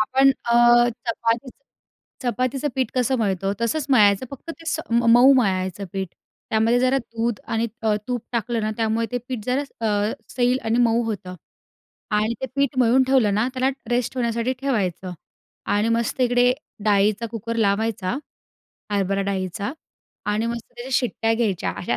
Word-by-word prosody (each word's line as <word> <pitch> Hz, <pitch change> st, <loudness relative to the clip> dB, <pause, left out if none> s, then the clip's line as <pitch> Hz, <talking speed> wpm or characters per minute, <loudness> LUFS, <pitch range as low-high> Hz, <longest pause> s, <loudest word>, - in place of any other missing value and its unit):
आपण 265 Hz, +5 st, +4 dB
अ, 240 Hz, 0 st, +5 dB, 0.2 s
चपातीचं 230 Hz, +2 st, -1 dB, 0.6 s
चपातीचं 255 Hz, +3 st, -1 dB
पीठ 260 Hz, -1 st, 0 dB
कसं 255 Hz, +1 st, +1 dB
मळतो? 195 Hz, -2 st, 0 dB
तसंच 245 Hz, +6 st, -1 dB
मळायचं 210 Hz, -2 st, +4 dB
फक्त 280 Hz, +4 st, -8 dB
ते 330 Hz, 0 st, -11 dB
स 320 Hz, -, -1 dB
मऊ 235 Hz, +3 st, +6 dB
मळायचं 190 Hz, -5 st, 0 dB
पीठ. 190 Hz, -1 st, -2 dB, 0.4 s
त्यामध्ये 225 Hz, +2 st, +3 dB
जरा 255 Hz, +2 st, +3 dB
दूध 230 Hz, -2 st, -3 dB
आणि 225 Hz, +1 st, 0 dB, 0.2 s
अ, 220 Hz, -1 st, +2 dB
त -, -, -4 dB
तूप 245 Hz, -2 st, -2 dB
टाकलं 235 Hz, 0 st, -1 dB
ना 215 Hz, -, 0 dB
त्यामुळे 225 Hz, 0 st, 0 dB
ते 245 Hz, -, 0 dB
पीठ 245 Hz, -5 st, -4 dB
जरा 255 Hz, +3 st, +1 dB, 0.2 s
अ, 210 Hz, 0 st, +1 dB, 0.2 s
सैल 250 Hz, 0 st, +1 dB
आणि 225 Hz, +2 st, +1 dB
मऊ 230 Hz, +1 st, +2 dB
होतं 190 Hz, -5 st, -5 dB, 0.8 s
आणि 215 Hz, +2 st, +1 dB
ते -, -, 0 dB
पीठ 280 Hz, -1 st, +1 dB
मळून 250 Hz, +1 st, +5 dB
ठेवलं 245 Hz, -7 st, +3 dB
ना 215 Hz, +4 st, +1 dB
त्याला 260 Hz, 0 st, +1 dB, 0.2 s
रेस्ट 245 Hz, +1 st, 0 dB
होण्यासाठी 235 Hz, +1 st, 0 dB
ठेवायचं 195 Hz, -, -1 dB, 0.6 s
आणि 210 Hz, +2 st, +2 dB
मस्त 235 Hz, +2 st, -1 dB
इकडे 245 Hz, 0 st, +4 dB, 0.3 s
डाळीचा 210 Hz, +2 st, +2 dB
कुकर 230 Hz, 0 st, -4 dB
लावायचा. 210 Hz, 0 st, 0 dB, 0.8 s
हरभरा 195 Hz, 0 st, 0 dB
डाळीचा 195 Hz, +2 st, -3 dB, 0.5 s
आणि 210 Hz, +2 st, 0 dB
मस्त 235 Hz, -1 st, -5 dB
त्या 240 Hz, +2 st, -7 dB
शिट्ट्या 230 Hz, -3 st, +1 dB
घ्यायच्या 215 Hz, -6 st, 0 dB
अशा 120 Hz, -9 st, -1 dB
230 Hz, 155 wpm, -23 LUFS, 210-250 Hz, 0.8 s, मऊ